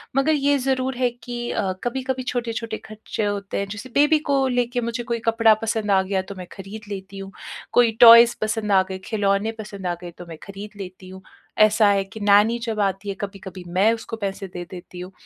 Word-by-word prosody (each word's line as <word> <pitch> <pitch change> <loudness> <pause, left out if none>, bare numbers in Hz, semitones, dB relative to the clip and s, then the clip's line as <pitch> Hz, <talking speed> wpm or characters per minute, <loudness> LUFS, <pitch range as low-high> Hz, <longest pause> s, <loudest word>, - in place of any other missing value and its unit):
मगर 275 +3 +3
ये 285 -1 +2
ज़रूर 260 0 -1
है 250 -1 +2
कि 240 0 -6
अ, 195 -2 -1
कभी-कभी 260 +1 -2
छोटे-छोटे 230 -3 -3
खर्चे 215 0 -5
होते 200 -1 -3
हैं 200 - -2
जैसे 210 +5 -8
बेबी 295 +2 +5
को 275 -1 +3
लेके 245 -1 0
मुझे 235 +1 -3
कोई 235 0 -2
कपड़ा 225 -1 +5
पसंद 220 -2 -1
आ 190 - +5
गया 190 0 -1
तो 195 +1 -9
मैं 180 -1 -8
खरीद 200 +2 -9
लेती 195 -1 -7
हूँ। 195 0 -8 0.4
कोई 240 -2 +5
टॉयज़ 235 0 +9
पसंद 215 -1 -1
आ 190 -1 +6
गए 190 - -4
खिलौने 205 0 0
पसंद 200 -3 -6
आ 175 - -1
गए 175 -1 -8
तो 175 - -9
मैं 165 -2 -10
खरीद 200 +1 -9
लेती 185 0 -10
हूँ। 190 0 -11 0.4
ऐसा 215 0 +5
है 195 -1 +2
कि 195 +3 -11
नैनी 205 +3 +4
जब 225 -3 -3
आती 195 0 -1
है - - -1
कभी-कभी 195 -2 -7
मैं 190 +6 +3
उसको 225 0 -6
पैसे 195 -1 -4
दे 180 -1 -7
देती 180 -1 -10
हूँ 180 +1 -8
215 Hz, 210 wpm, -23 LUFS, 195-235 Hz, 0.4 s, टॉयज़